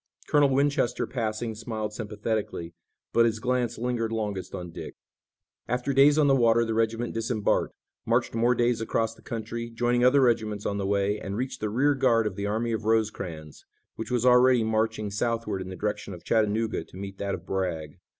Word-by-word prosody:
Colonel 145 -1 +4
Winchester 135 -2 +1
passing 110 -2 -3
smiled 110 -1 -4
sympathetically, 105 -5 -3 0.4
but 115 0 +5
his 115 -1 -1
glance 125 -1 0
lingered 115 -1 -1
longest 105 -4 -3
on 90 -2 -6
Dick. - - -8 0.7
After 125 +3 -1
days 140 +2 +6
on 155 - +5
the 135 -1 +5
water 115 -2 +4
the 115 - -2
regiment 115 +1 0
disembarked, 115 -1 0 0.3
marched - - +1
more 120 +2 +2
days 120 -1 +1
across 115 0 0
the - - -20
country, 115 +1 -5
joining 120 +1 +1
other 130 +3 +5
regiments 110 -4 +1
on 100 0 -1
the 95 - -1
way, 100 +1 +1
and 100 +1 -5
reached 130 +1 -3
the 105 - -2
rear 135 +7 +3
guard 125 -4 +3
of 105 -3 -2
the 100 0 -3
army 115 +3 -1
of 110 0 -2
Rosecrans, 100 -9 -2 0.3
which 110 - -6
was 125 -1 0
already 125 -1 +6
marching 110 -1 0
southward 110 -2 -1
in 95 - -6
the 95 - -6
direction 105 -1 -3
of 85 - -14
Chattanooga 110 0 +1
to - - -14
meet 95 0 -7
that 100 -1 -1
of - - -11
Bragg. 85 -6 -3
115 Hz, 190 wpm, -27 LUFS, 105-120 Hz, 0.7 s, days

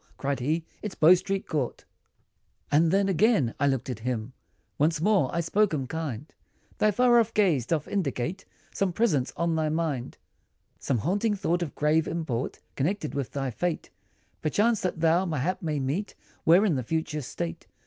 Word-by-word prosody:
Cried 140 0 -2
he, 155 +6 -1 0.2
"It's 210 -3 -5
Bow 160 +3 +7
Street 190 +2 -1
Court!" 145 -7 -3 0.9
And 160 +3 +4
then 195 +3 +2
again, 185 - +3
I 140 - +3
looked 135 -3 0
at 125 -4 -4
him, 120 0 -3 0.5
Once 155 +2 +2
more, 190 -6 +3
I 170 - 0
spoke 190 +1 +2
him 135 -3 -2
kind, 150 -2 -5 0.5
"Thy 215 - +4
far 240 +3 +4
off 230 0 0
gaze, 165 - +2
doth 155 -1 -1
indicate, 175 -1 -2 0.3
Some 195 -3 0
presence, 165 - +1
on 170 -1 +1
thy 155 -1 0
mind, 155 -6 -2 0.6
Some 130 - 0
haunting 205 - 0
thought, 175 -2 0
of 165 -5 -4
grave 155 +2 +2
import, 140 -8 -3
Connected 155 +3 -1
with 140 -3 -2
the 135 -2 -2
fate, 175 +7 -3 0.5
Perchance, 210 +8 +2
that 180 -3 -2
thou, 165 +2 +4
mayhap, 165 +2 -1
may 155 -3 -1
meet, 145 +10 -2 0.3
When 175 +6 +6
in 190 - +2
the 130 - 0
future 155 +2 -2
state. 85 - -5
160 Hz, 170 wpm, -27 LUFS, 140-190 Hz, 0.9 s, Bow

